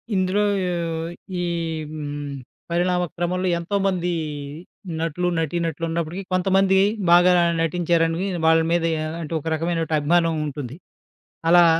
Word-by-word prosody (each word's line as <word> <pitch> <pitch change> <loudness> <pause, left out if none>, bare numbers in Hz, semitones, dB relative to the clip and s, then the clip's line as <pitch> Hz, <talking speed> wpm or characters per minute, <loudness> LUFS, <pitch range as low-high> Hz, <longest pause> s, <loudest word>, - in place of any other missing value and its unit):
ఇందులో 190 +2 +1 1.0
ఈ - - -1 0.5
హ్మ్. 145 -2 -5 0.4
పరిణామ 180 +1 +1
క్రమంలో 180 +2 -1
ఎంతోమంది 185 -1 0 0.9
నటులు, 165 +2 -1
నటీ 165 +1 -1
నటులున్నప్పటికి 165 +3 -3
కొంతమంది 190 +1 +3 0.3
బాగా 175 +1 +7 0.3
నటించారనివి 165 +1 +1 0.2
వాళ్ళ 160 0 +5
మీద 170 -1 +2
యా 155 0 -2 0.2
అంటే, 160 0 -5
ఒక 150 - -15
రకమైనటి 165 0 -1
అభిమానం 165 +2 +2
ఉంటుంది. 140 -2 -6 0.7
అలా 175 0 +7
170 Hz, 105 wpm, -23 LUFS, 160-180 Hz, 1.0 s, బాగా